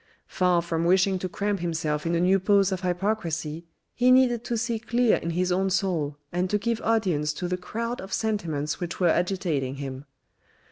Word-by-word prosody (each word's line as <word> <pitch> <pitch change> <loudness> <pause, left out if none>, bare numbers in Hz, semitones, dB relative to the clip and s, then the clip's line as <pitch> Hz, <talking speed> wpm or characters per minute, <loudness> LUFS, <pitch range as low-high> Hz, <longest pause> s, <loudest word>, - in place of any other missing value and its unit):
Far 180 -2 +1
from 165 -1 -1
wishing 185 +1 +3
to 185 - -3
cramp 205 +2 -1
himself 160 -2 -2
in 170 - +1
a - - +1
new 185 +2 +3
pose 195 0 +3
of 190 -1 -2
hypocrisy 170 -4 -2 0.3
he 250 +1 +3
needed 255 -2 +4
to 235 - -1
see 230 0 -1
clear 235 +1 +2
in 170 - -4
his 180 +2 0
own 190 +2 +1
soul, 175 -7 -1
and 180 +1 -1
to 210 - +2
give 230 +2 -2
audience 185 -10 +1
to 180 +4 -4
the 180 - -1
crowd 230 +6 -4
of 190 +1 -9
sentiments 165 -10 -2
which 175 -1 -5
were 180 -2 +4
agitating 170 -7 0
him. 135 -1 -6
180 Hz, 190 wpm, -26 LUFS, 165-210 Hz, 0.3 s, needed